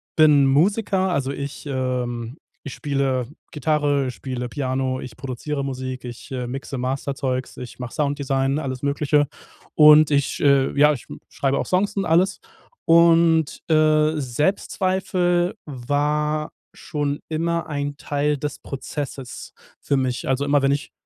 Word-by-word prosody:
bin 150 -3 +6
Musiker, 190 +7 +2
also 140 -5 -1
ich 140 +1 -6
ähm, 125 -2 -3 0.3
ich 140 - -6
spiele 135 -4 -1 0.2
Gitarre, 145 -2 0
spiele 125 -1 -5
Piano, 130 0 -2
ich 120 -3 -9
produziere 135 +2 -4
Musik, 130 -2 -5
ich, 120 +3 -9
äh, 125 -2 -3
mixe 135 +2 -5
Masterzeugs, 130 0 -3
ich 125 0 -9
mache 125 -1 -6
Sounddesign, 140 -2 0
alles 130 -3 -5
Mögliche. 145 +1 +2 0.5
Und 150 0 +7
ich, 140 -1 +1
äh, 140 -2 +4
ja 150 +1 +6
ich 130 - -8 0.2
schreibe 135 0 0
auch - - -2
Songs 195 +3 0
und 195 - 0
alles 175 +4 +2 0.5
und, 165 -1 +4
äh, 155 0 +3
Selbstzweifel 180 - 0
war 150 +3 -1 0.2
schon 145 -1 -3
immer 165 +1 -1
ein 145 -1 -3
Teil 145 0 -1
des 145 +1 -5
Prozesses 135 -1 -6 0.3
für 140 - 0
mich. 130 -2 -2
Also 135 +1 +1
immer, 145 0 +3
wenn 135 0 +2
ich 145 +2 -2
140 Hz, 135 wpm, -22 LUFS, 130-155 Hz, 0.5 s, Und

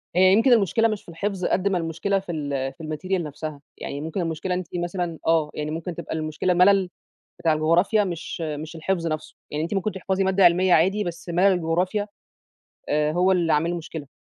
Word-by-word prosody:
هي 185 +1 +6
يمكن 235 +5 +5
المشكلة 225 +1 +3
مش 215 -2 -3
في - - -15
الحفظ، 185 +2 -3
قد 195 +2 +1
ما 195 - +1
المشكلة 170 +4 -1
في 190 -2 -7
ال 140 -4 -3
في - - -14
ال - - -6
material 185 +4 -1
نفْسها. 150 0 -6 0.2
يعني 140 - -5
ممكن 160 +4 -3
المشكلة 165 +2 -2
إن - - 0
أنتِ 180 - -7 0.2
مثلًا 175 -2 -3
آه، 160 -2 +3
يعني 150 0 -4
ممكن 165 +1 -4
تبقى 170 -2 -5
المشكلة 155 +3 -1
ملل 185 +1 +4 0.5
بتاع 165 - +2
الجغرافيا 170 +7 +3
مش 175 -2 -5
مش 155 0 -5
الحفظ 170 +1 -1
نفْسه. 155 -1 -4
يعني 150 +1 -2
أنتِ 170 - -3
ممكن 195 +2 -1
تحفظي 190 0 -1
مادة 190 0 +3
علمية 180 +1 +5
عادي، 195 +6 +3
بس 175 0 -6
ملل 180 +3 +4
الجغرافيا، 180 +4 0 0.8
آآ 150 0 +1
هو 180 +3 +3
اللي 170 -3 +2
عامل 165 +3 +1
مشكلة. 160 -3 -6
175 Hz, 205 wpm, -24 LUFS, 160-190 Hz, 0.8 s, هي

